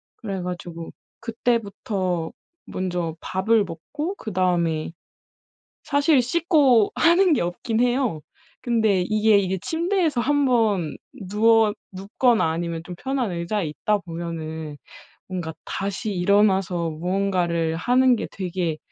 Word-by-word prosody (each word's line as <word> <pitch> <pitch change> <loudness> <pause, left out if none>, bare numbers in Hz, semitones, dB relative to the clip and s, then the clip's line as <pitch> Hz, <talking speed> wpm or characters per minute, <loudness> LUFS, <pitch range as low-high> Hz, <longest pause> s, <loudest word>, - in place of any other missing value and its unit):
그래 195 -4 -5
가지고 175 -2 -6 0.3
그때부터 205 -7 -2 0.3
먼저 175 -3 -3
밥을 210 +3 +1
먹고 295 - -5
그다음에 175 - -1 0.9
사실 285 -1 +3
씻고 275 - +3
하는 345 +1 +4
게 - - +1
없긴 200 +6 -2
해요. 245 - +1 0.4
근데 220 -6 +2
이게 215 +2 +3
이게 190 -1 -1
침대에서 330 - 0
1 285 +2 +2
번 210 - +1 0.3
누워 220 +1 +4 0.2
눕거나 215 +4 +1
아니면 165 0 -3
좀 180 - -7
편한 260 -2 -2
의자에 170 +3 -2
있다 210 +7 0
보면은 160 -3 -6 0.5
뭔가 175 -3 -4
다시 200 +3 -3
일어나서 190 -2 +2
무언가를 175 -1 -1
하는 250 +5 +3
게 - - -4
되게 175 -4 -3
195 Hz, 245 characters per minute, -23 LUFS, 175-240 Hz, 0.9 s, 하는